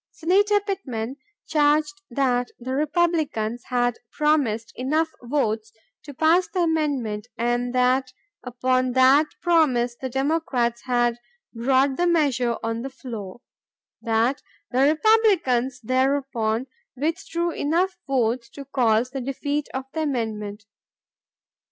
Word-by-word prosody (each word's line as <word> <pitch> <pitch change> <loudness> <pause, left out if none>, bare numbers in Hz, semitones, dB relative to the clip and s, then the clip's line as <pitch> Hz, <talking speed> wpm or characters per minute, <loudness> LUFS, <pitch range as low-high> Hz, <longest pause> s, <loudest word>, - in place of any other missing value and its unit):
Senator 405 +5 +2
Pittman 275 - -4 0.3
charged 305 +4 +2
that 245 -1 0
the 255 +2 -4
Republicans 295 -7 0
had 245 -1 0
promised 275 -8 +1
enough 310 +6 0
votes 225 -4 -1 0.3
to 290 - -8
pass 325 +6 +3
the 365 - -2
amendment 280 -10 -1
and 240 +1 0
that 255 +1 +2 0.3
upon 255 0 0
that 265 +4 +5 0.2
promise 260 -9 +3
the 260 +2 -5
Democrats 265 -4 -1
had 240 -1 +1 0.3
brought 265 +3 +2
the 350 - +2
measure 265 -8 +2
on 225 0 -2
the 270 - -5
floor; 240 -6 -8 0.6
that 230 +4 +1 0.3
the 255 - 0
Republicans 315 - +3
thereupon 255 -2 0 0.3
withdrew 335 +3 -1
enough 345 +5 0
votes 240 -2 0
to 275 +3 -10
cause 245 -2 +1
the 270 0 -4
defeat 285 +3 -3
of 265 - -3
the 320 - -2
amendment. 215 -7 -3
260 Hz, 115 wpm, -24 LUFS, 240-305 Hz, 0.6 s, that